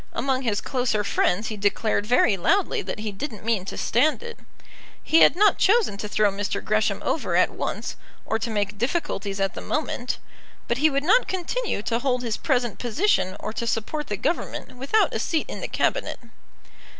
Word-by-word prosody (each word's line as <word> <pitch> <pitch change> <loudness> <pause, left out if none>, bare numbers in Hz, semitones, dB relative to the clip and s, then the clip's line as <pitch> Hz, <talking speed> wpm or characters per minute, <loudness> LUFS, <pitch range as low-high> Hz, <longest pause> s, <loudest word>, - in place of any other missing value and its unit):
Among 265 -1 0
his 220 -5 0
closer 245 -6 0
friends 200 +1 +1
he 215 - -5
declared 205 +1 0
very 240 -3 +4
loudly 395 - +1
that - - -5
he 215 -1 -3
didn't 215 0 -6
mean 220 -5 +1
to - - -6
stand 300 - +2
it. 475 0 -8 0.6
He 325 - +4
had - - +7
not 415 +3 +4
chosen 425 - +3
to 210 - -4
throw 210 -1 +3
Mr. 205 +1 -2
Gresham 215 0 +1
over - - 0
at - - +4
once, - - -4 0.3
or 220 - -1
to 235 - -3
make 205 -2 -2
difficulties 215 - -2
at 195 0 0
the - - -6
moment; 255 -5 -2 0.5
but 235 - 0
he 310 +2 +5
would 280 -1 0
not 430 +10 +4
continue 375 - -2
to 230 +1 0
hold 250 -1 0
his 230 -3 -2
present 245 -6 0
position 240 - +1
or 215 - -5
to 235 - -3
support 275 +7 -2
the 205 - -3
Government 335 - -3
without 275 - +1
a - - -1
seat 320 -2 0
in - - -7
the - - -3
Cabinet. - - -1
240 Hz, 190 wpm, -24 LUFS, 210-305 Hz, 0.6 s, had